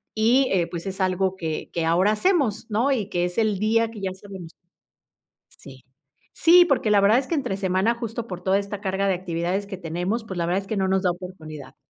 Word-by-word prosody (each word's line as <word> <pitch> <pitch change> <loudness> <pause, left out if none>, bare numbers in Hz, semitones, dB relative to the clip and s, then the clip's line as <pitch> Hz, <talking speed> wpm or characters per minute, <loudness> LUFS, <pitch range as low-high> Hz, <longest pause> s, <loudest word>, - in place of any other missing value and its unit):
y, 245 +5 +3
eh, 180 -3 +2
pues, 170 +1 -7
es 190 0 -4
algo 185 0 0
que 160 -4 -4
que 165 -1 -1
ahora 180 +5 +3
hacemos, 250 - +1
¿no? 235 +7 +1
Y 210 -6 -2
que 175 0 0
es 180 +3 -5
el 215 -4 +1
día 225 +1 +1
que 215 - -9
ya 190 -1 -2
sabemos. 190 -3 -10 1.1
Sí. 130 -2 -14 0.5
Sí, 350 +2 +7
porque 275 -8 +1
la 200 -1 +5
verdad 210 +4 +5
es 265 - -5
que 335 - -1
entre 245 -9 -2
semana, 190 +4 +1
justo, 230 0 -5
por 180 -1 -7
toda 190 +2 +2
esta 200 0 -5
carga 195 0 -1
de 190 - +2
actividades 175 +2 -2
que 190 -2 -6
tenemos, 180 +7 -3
pues, 190 -4 -6
la 170 - 0
verdad 180 +3 0
es 195 - -14
que 215 - -3
no 190 -1 +1
nos 190 0 +1
da 180 - +3
oportunidad, 160 -6 -9
195 Hz, 225 wpm, -24 LUFS, 180-220 Hz, 1.1 s, Sí